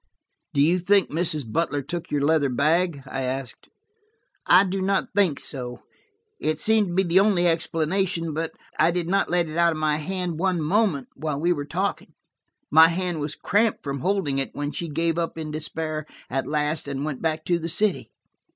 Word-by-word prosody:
"Do 140 Hz, -, +3 dB
you 170 Hz, +5 st, +3 dB
think 195 Hz, +2 st, +2 dB
Mrs. 160 Hz, -2 st, +1 dB
Butler 145 Hz, +1 st, -1 dB
took 170 Hz, +4 st, -5 dB
your 145 Hz, -, 0 dB
leather 155 Hz, -2 st, +2 dB
bag?" 155 Hz, +3 st, +1 dB
I 135 Hz, 0 st, -4 dB
asked. 130 Hz, -1 st, -5 dB, 0.8 s
"I 185 Hz, +2 st, +7 dB
do 190 Hz, 0 st, -2 dB
not 195 Hz, 0 st, 0 dB
think 185 Hz, -9 st, +2 dB
so. 125 Hz, -3 st, -3 dB, 0.6 s
It 155 Hz, 0 st, -1 dB
seems 215 Hz, +4 st, +3 dB
to 175 Hz, -, -5 dB
be 190 Hz, -, +3 dB
the 175 Hz, +1 st, +4 dB
only 195 Hz, -3 st, +3 dB
explanation, 165 Hz, +1 st, 0 dB
but 160 Hz, +1 st, -3 dB, 0.3 s
I 165 Hz, -, +5 dB
did 170 Hz, -1 st, -1 dB
not 195 Hz, +2 st, +1 dB
let 175 Hz, -1 st, +2 dB
it 155 Hz, +1 st, -6 dB
out 170 Hz, -1 st, +4 dB
of -, -, -6 dB
my 155 Hz, -1 st, +1 dB
hand 175 Hz, 0 st, -3 dB
one 185 Hz, -1 st, +1 dB
moment 165 Hz, -, +1 dB
while 150 Hz, -1 st, -3 dB
we 175 Hz, +3 st, +2 dB
were 145 Hz, -3 st, -5 dB
talking. 185 Hz, +7 st, -3 dB, 0.6 s
My 160 Hz, +1 st, +8 dB
hand 175 Hz, 0 st, -2 dB
was 145 Hz, 0 st, -3 dB
cramped 210 Hz, +2 st, +1 dB
from 140 Hz, -1 st, -4 dB
holding 175 Hz, -5 st, 0 dB
it, 135 Hz, -, -3 dB
when 145 Hz, 0 st, -3 dB
she 170 Hz, +1 st, -4 dB
gave 165 Hz, +2 st, 0 dB
up 165 Hz, -1 st, -3 dB
in 155 Hz, -1 st, -5 dB
despair 155 Hz, 0 st, -4 dB, 0.2 s
at 135 Hz, +1 st, -1 dB
last, 150 Hz, 0 st, 0 dB
and 140 Hz, 0 st, -3 dB
went 150 Hz, -4 st, -4 dB
back 160 Hz, -1 st, -1 dB
to 175 Hz, -1 st, +1 dB
the 165 Hz, 0 st, -3 dB
city." 210 Hz, +5 st, +1 dB
165 Hz, 195 wpm, -24 LUFS, 150-180 Hz, 0.8 s, My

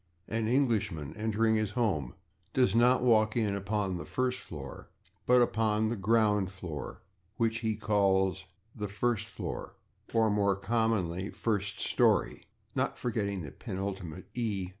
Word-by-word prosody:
An 110 Hz, 0 st, -1 dB
Englishman, 110 Hz, -, 0 dB
entering 110 Hz, +1 st, +1 dB
his 110 Hz, -2 st, +1 dB
home, 85 Hz, -, 0 dB, 0.4 s
does 125 Hz, -1 st, +3 dB
not 120 Hz, +2 st, +4 dB
walk 110 Hz, -2 st, +4 dB
in 105 Hz, -3 st, +1 dB
upon 100 Hz, -1 st, -1 dB
the -, -, -5 dB
[Pg103] -, -, -14 dB, 0.3 s
/first -, -, -7 dB
floor/, 70 Hz, -4 st, -9 dB, 0.4 s
but 125 Hz, 0 st, +6 dB
upon 110 Hz, -2 st, +1 dB
the 120 Hz, -, -1 dB
/ground 105 Hz, -1 st, +2 dB
floor/. 90 Hz, -6 st, -7 dB, 0.3 s
What 115 Hz, -1 st, +2 dB
he 110 Hz, -1 st, -1 dB
calls 95 Hz, -3 st, +2 dB, 0.3 s
the 105 Hz, -2 st, -3 dB
/first 110 Hz, +1 st, -1 dB
floor/ -, -, -6 dB, 0.4 s
(or, 110 Hz, -2 st, +3 dB
more 100 Hz, -1 st, +2 dB
commonly, 100 Hz, -4 st, 0 dB
/first 100 Hz, -3 st, -2 dB
storey/, -, -, +1 dB, 0.3 s
not -, -, -1 dB
forgetting 100 Hz, -6 st, -2 dB
the 70 Hz, -, -7 dB
penultimate 95 Hz, -3 st, -5 dB
/e 105 Hz, -6 st, -2 dB
105 Hz, 140 wpm, -30 LUFS, 95-115 Hz, 0.4 s, but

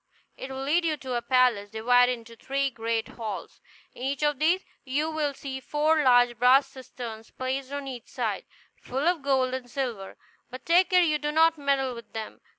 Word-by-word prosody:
It 260 Hz, -, -8 dB
will 265 Hz, 0 st, -5 dB
lead 320 Hz, +6 st, +2 dB
you 325 Hz, -2 st, +1 dB
into 260 Hz, -4 st, -5 dB
a 240 Hz, -, 0 dB
palace, 245 Hz, -5 st, +2 dB
divided 245 Hz, +3 st, +3 dB
into 230 Hz, -1 st, -10 dB
three 275 Hz, +3 st, -1 dB
great 225 Hz, -1 st, -2 dB
halls. 220 Hz, -3 st, -7 dB, 0.3 s
In -, -, -13 dB
each 275 Hz, +2 st, -2 dB
of 295 Hz, -2 st, +1 dB
these 340 Hz, +5 st, +2 dB, 0.2 s
you 295 Hz, +4 st, -1 dB
will 300 Hz, -3 st, -1 dB
see 265 Hz, -1 st, -6 dB
four 305 Hz, +3 st, +1 dB
large 245 Hz, -3 st, +4 dB
brass 255 Hz, +3 st, +6 dB
cisterns 245 Hz, -4 st, -9 dB
placed 260 Hz, +1 st, -4 dB
on 285 Hz, -1 st, -4 dB
each 250 Hz, -3 st, -7 dB
side, -, -, -3 dB, 0.4 s
full 270 Hz, +5 st, -2 dB
of 350 Hz, -3 st, +2 dB
gold 265 Hz, -2 st, +1 dB
and 255 Hz, -1 st, -5 dB
silver; 240 Hz, -8 st, -4 dB, 0.3 s
but 255 Hz, +1 st, -10 dB
take 355 Hz, +3 st, +4 dB
care 365 Hz, -2 st, +5 dB
you 305 Hz, -3 st, +1 dB
do 295 Hz, +1 st, -2 dB
not 325 Hz, +1 st, +4 dB
meddle 275 Hz, -3 st, 0 dB
with 235 Hz, -1 st, -12 dB
them. 220 Hz, -1 st, -7 dB
265 Hz, 195 wpm, -27 LUFS, 245-295 Hz, 0.4 s, brass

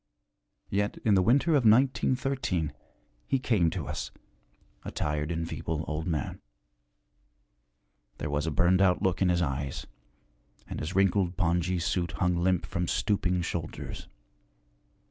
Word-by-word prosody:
Yet 105 Hz, +1 st, 0 dB
in 110 Hz, -, +4 dB
the 95 Hz, -, +5 dB
winter 135 Hz, -, +3 dB
of 145 Hz, -5 st, +4 dB
1913 130 Hz, -, +2 dB, 0.5 s
he 135 Hz, -, +2 dB
came 110 Hz, -10 st, +2 dB
to 85 Hz, -2 st, -4 dB
us, -, -, -4 dB, 0.7 s
a -, -, -5 dB
tired 75 Hz, +1 st, -2 dB
and 80 Hz, 0 st, -2 dB
feeble 80 Hz, -1 st, -3 dB
old 80 Hz, +2 st, -3 dB
man. 80 Hz, -5 st, -2 dB, 1.8 s
There 75 Hz, -, -4 dB
was 75 Hz, +2 st, -1 dB
a -, -, +2 dB
burned 85 Hz, +5 st, +3 dB
out 95 Hz, 0 st, +3 dB
look 95 Hz, -2 st, +1 dB
in 95 Hz, -, +4 dB
his 90 Hz, 0 st, +2 dB
eyes, 70 Hz, -2 st, -3 dB, 0.8 s
and -, -, -5 dB
his 75 Hz, +5 st, -4 dB
wrinkled 95 Hz, -2 st, +2 dB
pongee 90 Hz, 0 st, +1 dB
suit 85 Hz, 0 st, -1 dB
hung 90 Hz, -1 st, +1 dB
limp 90 Hz, +1 st, +1 dB
from 85 Hz, 0 st, -2 dB
stooping 90 Hz, -3 st, 0 dB
shoulders. -, -, -5 dB
90 Hz, 140 wpm, -28 LUFS, 80-100 Hz, 1.8 s, the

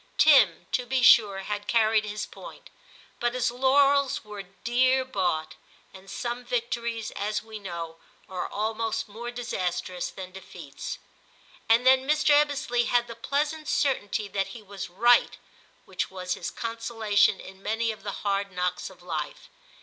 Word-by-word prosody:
Tim, 215 Hz, -, +6 dB
to 250 Hz, -1 st, -1 dB
be 260 Hz, 0 st, +1 dB
sure, 205 Hz, -4 st, +6 dB
had 205 Hz, +1 st, -4 dB
carried 220 Hz, -1 st, +3 dB
his 210 Hz, 0 st, -4 dB
point, -, -, -12 dB, 0.5 s
but 240 Hz, +1 st, 0 dB
his 250 Hz, -1 st, +1 dB
laurels 275 Hz, +2 st, +3 dB
were 210 Hz, -1 st, -7 dB
dear 245 Hz, +7 st, +1 dB
bought, 180 Hz, -10 st, -1 dB, 0.4 s
and 190 Hz, 0 st, -13 dB
some 240 Hz, +2 st, -4 dB
victories, 235 Hz, -2 st, -2 dB
as 210 Hz, +2 st, -2 dB
we 220 Hz, -1 st, -9 dB
know, 170 Hz, -4 st, -6 dB, 0.3 s
are 180 Hz, -2 st, -4 dB
almost 220 Hz, +1 st, -2 dB
more 230 Hz, +3 st, -7 dB
disastrous 185 Hz, -7 st, -3 dB
than 185 Hz, -1 st, -9 dB
defeats; 175 Hz, -6 st, -8 dB, 0.7 s
and 230 Hz, +2 st, +5 dB
then 260 Hz, +1 st, +5 dB
Mr. 305 Hz, 0 st, +3 dB
Ebbesley 275 Hz, -5 st, +2 dB
had 240 Hz, -1 st, +2 dB
the 235 Hz, -, -8 dB
pleasant 295 Hz, +5 st, -2 dB
certainty 215 Hz, -6 st, 0 dB
that 195 Hz, -1 st, -1 dB
he 220 Hz, -, -13 dB
was 200 Hz, -2 st, -7 dB
right, 240 Hz, +7 st, +4 dB, 0.5 s
which -, -, -3 dB
was 180 Hz, -1 st, -3 dB
his -, -, -4 dB
consolation 225 Hz, -3 st, +1 dB
in 190 Hz, 0 st, -12 dB
many 225 Hz, +2 st, 0 dB
of 215 Hz, -, -10 dB
the 200 Hz, -, -4 dB
hard 200 Hz, 0 st, 0 dB
knocks 180 Hz, 0 st, -2 dB
of 180 Hz, -2 st, -17 dB
life. 160 Hz, -4 st, -5 dB
220 Hz, 150 wpm, -27 LUFS, 195-245 Hz, 0.7 s, Tim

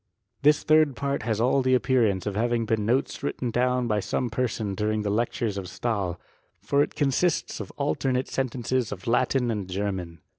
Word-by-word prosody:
This 150 Hz, +1 st, +4 dB
tliird 155 Hz, -3 st, +4 dB
part 140 Hz, +1 st, -2 dB
has 110 Hz, -1 st, -1 dB
all 130 Hz, +4 st, +3 dB
the 130 Hz, 0 st, +3 dB
appearance 120 Hz, -7 st, +2 dB
of 105 Hz, -2 st, -2 dB
having 120 Hz, +1 st, +1 dB
been 110 Hz, -2 st, 0 dB
notes 130 Hz, +4 st, 0 dB
written 130 Hz, -3 st, -2 dB
down 125 Hz, +1 st, +1 dB
by 105 Hz, -2 st, +1 dB
some 120 Hz, +4 st, -2 dB
person 110 Hz, -4 st, -1 dB
during 105 Hz, +2 st, -1 dB
the 100 Hz, -, -1 dB
lectures 115 Hz, -1 st, -1 dB
of 95 Hz, -, -6 dB
Stahi: 95 Hz, -3 st, -2 dB, 0.4 s
for 140 Hz, -, +1 dB
it -, -, -1 dB
consists 150 Hz, +4 st, 0 dB
of -, -, -6 dB
alternate 125 Hz, +11 st, 0 dB
sentences 130 Hz, -2 st, -1 dB
of 95 Hz, -2 st, -6 dB
JLatin 125 Hz, +1 st, +1 dB
and 100 Hz, -4 st, -4 dB
Ger 100 Hz, +2 st, -1 dB
man. 85 Hz, -3 st, -6 dB
120 Hz, 185 wpm, -26 LUFS, 105-130 Hz, 0.4 s, This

